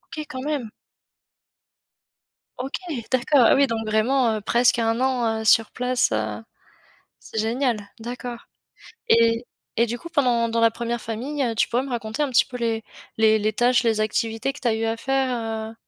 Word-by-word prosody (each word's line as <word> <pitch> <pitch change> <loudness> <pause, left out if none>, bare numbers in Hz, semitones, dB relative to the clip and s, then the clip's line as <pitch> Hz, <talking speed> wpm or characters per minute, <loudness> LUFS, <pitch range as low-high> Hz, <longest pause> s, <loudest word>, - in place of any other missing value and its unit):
OK, 305 - -5
quand 260 - -6
même! 285 -7 -2 1.9
OK! 265 +2 -4 0.4
D'accord. 260 +2 +3
Ah - - +6
oui, 275 0 +4
donc, 225 -2 -3
vraiment, 225 +2 +2
heu, - - -6
presque 240 +3 +3
un 225 +1 +1
an, 240 -4 0
heu, 220 - -7
sur 225 0 +5
place, 250 0 0
heu, 110 0 -2 0.8
c'est - - -7
génial! 235 +1 0 0.2
D'accord. 240 +1 -7 0.6
Et 230 +1 +4 0.3
et 235 - +4
du 240 +1 -4
coup, 340 - -9
pendant 245 -7 +2
dans 230 0 0
la 230 0 +5
1re 235 +1 -3
famille, 265 +6 -3
tu - - +1
pourrais 245 +2 0
me 270 - -7
raconter 225 +2 -3
un 290 - 0
petit 245 - +4
peu 250 - -7
les 225 -2 -1 0.4
les 220 0 +5
les 215 +1 0
tâches, 240 +3 +3
les 225 -2 +1
activités 225 +4 -1
que - - -11
tu 245 - 0
as 220 - +2
eu 225 0 -2
à 225 0 -1
faire, 270 +2 0 0.4
heu? 225 - -11
235 Hz, 185 wpm, -23 LUFS, 225-255 Hz, 1.9 s, Ah